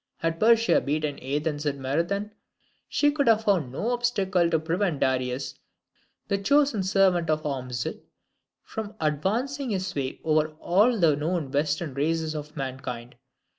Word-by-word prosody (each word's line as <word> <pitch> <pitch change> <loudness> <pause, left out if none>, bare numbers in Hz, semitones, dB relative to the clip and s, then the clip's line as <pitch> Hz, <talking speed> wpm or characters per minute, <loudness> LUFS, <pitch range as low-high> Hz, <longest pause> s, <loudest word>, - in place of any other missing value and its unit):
Had 165 0 -2
Persia 230 +1 +4
beaten 150 0 -2
Athens 145 +3 -2
at 145 - 0
Marathon, 170 +10 -1 0.6
she 290 0 +3
could 285 -3 0
have 225 -1 +4
found 180 - +1
no 215 - -2
obstacle 200 -8 +1
to 165 - +3
prevent 165 0 -1
Darius, 130 0 0 0.7
the 200 - 0
chosen 280 0 +3
servant 185 -3 +2
of 155 0 0
Ormuzd, 125 -4 -3 0.6
from 220 -1 -6
advancing 230 - -1
his 190 -3 -1
sway 140 -9 -3
over 155 0 +1
all 210 +7 +3
the 160 -4 +4
known 155 -1 -2
Western 150 +1 0
races 160 +3 0
of 150 +1 -7
mankind. 130 -3 -5
165 Hz, 140 wpm, -26 LUFS, 145-200 Hz, 0.7 s, Persia